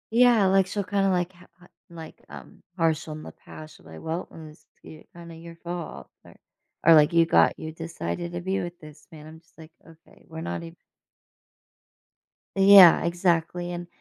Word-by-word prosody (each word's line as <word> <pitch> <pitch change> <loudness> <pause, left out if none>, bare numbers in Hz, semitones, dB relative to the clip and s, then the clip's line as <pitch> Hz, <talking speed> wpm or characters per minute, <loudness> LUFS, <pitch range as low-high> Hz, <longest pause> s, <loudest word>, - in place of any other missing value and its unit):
Yeah, 240 -4 +4
like, 190 0 +2
she'll 200 +2 -4
kinda, 195 0 -1
like 180 -1 -1
ha 180 0 -20
ha 180 0 -20 0.2
like, 165 -2 -12
um, - - -13 0.2
partial 160 -2 -1
in 155 0 -10
the - - -10
past, 155 0 -14
she'll - - -21
be 80 - -13
like, 80 - -11
"Well, 165 +2 -5
mm, 155 -2 -12
skit 155 -1 -18
kinda 170 -1 -12
your 165 +1 -12
fault," 170 0 -8 0.2
or - - -18 0.5
or, 165 - +7
like, 150 +1 +4
"You 165 0 +4
got 85 - +2
you 160 - -7
decided 165 - -6
to 175 - -5
be 190 +2 -2
with 175 0 -8
this 150 -2 -16
man," 155 -1 -13
I'm 160 +1 -13
just 165 - -34
like, 160 0 -14
"Okay, 165 0 -21
we're 160 0 -9
not 170 - -5
ev" 165 0 -11 1.8
Yeah, 195 -2 +7
exactly, 175 0 -1
and, 175 0 -7
170 Hz, 190 wpm, -24 LUFS, 160-180 Hz, 1.8 s, or